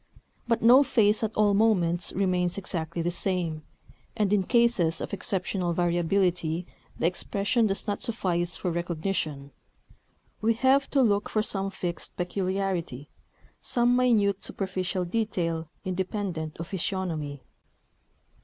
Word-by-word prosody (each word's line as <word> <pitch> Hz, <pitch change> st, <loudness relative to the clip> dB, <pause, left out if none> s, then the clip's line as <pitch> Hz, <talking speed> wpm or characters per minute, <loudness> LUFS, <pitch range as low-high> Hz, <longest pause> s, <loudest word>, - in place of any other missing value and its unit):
But 230 Hz, -2 st, +1 dB
no 245 Hz, +4 st, +8 dB
face 215 Hz, -6 st, +3 dB
at 220 Hz, 0 st, -2 dB
all 210 Hz, -1 st, +3 dB
moments 185 Hz, -5 st, +2 dB
remains 180 Hz, -2 st, 0 dB
exactly 170 Hz, -3 st, -3 dB
the 175 Hz, -, 0 dB
same; 175 Hz, -4 st, -2 dB, 0.6 s
and 210 Hz, -2 st, +2 dB
in 205 Hz, -, +4 dB
cases 195 Hz, -7 st, +2 dB
of -, -, -5 dB
exceptional 185 Hz, -2 st, -1 dB
variability 175 Hz, -1 st, +1 dB, 0.3 s
the -, -, -1 dB
expression 200 Hz, +6 st, +1 dB
does 195 Hz, -1 st, -2 dB
not 205 Hz, -2 st, -2 dB
suffice 175 Hz, -6 st, -1 dB
for 180 Hz, -, -2 dB
recognition: 165 Hz, -4 st, -3 dB, 0.9 s
we 225 Hz, +1 st, +2 dB
have 270 Hz, +3 st, +3 dB
to 275 Hz, -2 st, +3 dB
look 205 Hz, -3 st, +1 dB
for 215 Hz, -, +1 dB
some 195 Hz, -2 st, -2 dB
fixed 175 Hz, -3 st, -5 dB
peculiarity, 180 Hz, -6 st, -2 dB, 0.5 s
some 240 Hz, 0 st, +3 dB
minute 215 Hz, -6 st, +2 dB
superficial 185 Hz, -1 st, -2 dB
detail 170 Hz, -6 st, -2 dB, 0.2 s
independent 185 Hz, -4 st, -3 dB
of 165 Hz, -, -5 dB
physiognomy. 165 Hz, -7 st, -3 dB
185 Hz, 125 wpm, -27 LUFS, 170-210 Hz, 0.9 s, no